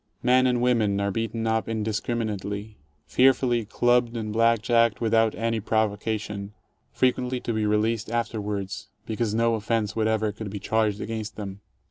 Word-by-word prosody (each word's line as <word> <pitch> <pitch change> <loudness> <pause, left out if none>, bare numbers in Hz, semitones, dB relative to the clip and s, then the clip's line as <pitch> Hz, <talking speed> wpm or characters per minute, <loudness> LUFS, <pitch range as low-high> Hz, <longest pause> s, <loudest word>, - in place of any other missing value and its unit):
Men 130 +1 +4
and 125 -1 +1
women 110 -5 +2
are 100 0 0
beaten 115 +2 -2
up 110 0 0
indiscriminately, 110 -1 -3 0.3
fear 130 - +5
fully 120 -3 0
clubbed 120 +2 +2
and 110 -2 -3
blackjacked 115 0 +3
without 115 -1 +2
any 115 0 -1
provocation, 105 -1 -2 0.4
frequently 125 0 +1
to 115 - -2
be 110 -1 0
released 110 +1 +1
afterwards 105 -2 -3 0.2
because 110 -1 -1
no 115 0 +2
offence 110 -1 -1
whatever 110 -1 +1
could 105 0 -7
be 100 - -5
charged 105 0 0
against 110 -1 -4
them. 100 -2 -7
110 Hz, 145 wpm, -25 LUFS, 105-115 Hz, 0.4 s, fear